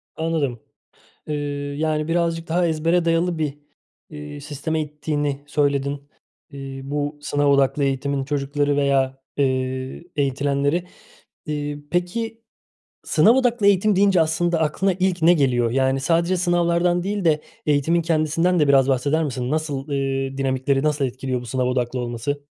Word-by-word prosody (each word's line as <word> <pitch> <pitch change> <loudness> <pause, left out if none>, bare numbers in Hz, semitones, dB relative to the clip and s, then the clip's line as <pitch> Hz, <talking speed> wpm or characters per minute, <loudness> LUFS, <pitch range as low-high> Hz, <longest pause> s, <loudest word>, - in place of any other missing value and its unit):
Anladım. 160 -7 -1 0.7
Eee, 150 - -2 0.4
yani, 155 0 0
birazcık 165 -1 0
daha 170 +1 +1
ezbere 165 +2 +1
dayalı 170 +1 +1
bir, 150 -2 -2 0.5
eee, 75 -1 -8
sisteme 155 - -3
ittiğini 145 -1 -3
söyledin, 140 -1 -1 0.4
eee, 135 -1 -7
bu 145 +1 -3
sınav 145 0 0
odaklı 140 0 +3
eğitimin 135 0 -1
çocukları 145 0 0
veya, 135 -2 +1 0.2
eee, 130 +1 -1
eğitilenleri. 140 +4 0 0.6
Eee, 145 -1 -3
peki, 225 +6 -2 0.6
sınav 230 +4 +4
odaklı 240 -5 +2
eğitim 200 +1 +4
deyince 195 -2 +4
aslında 165 +1 +1
aklına 170 +5 +1
ilk 185 -1 0
ne 170 +2 +6
geliyor? 125 -7 +2
Yani, 135 +1 +1
sadece 170 +6 +1
sınavlardan 175 0 +1
değil 200 0 -2
de 155 -2 +3 0.2
eğitimin 150 +3 +2
kendisinden 165 +2 +1
de 150 - +3
biraz 135 -1 +5
bahseder 140 +4 +1
misin? 130 -3 -3
Nasıl, 150 -2 -2
eee, 135 -1 -2
dinamikleri 135 0 0
nasıl 150 -2 +1
etkiliyor 130 0 -3
bu 125 - -10
sınav 125 +1 -1
odaklı 125 0 -1
olması? 120 +4 -3
145 Hz, 140 wpm, -22 LUFS, 135-165 Hz, 0.7 s, ne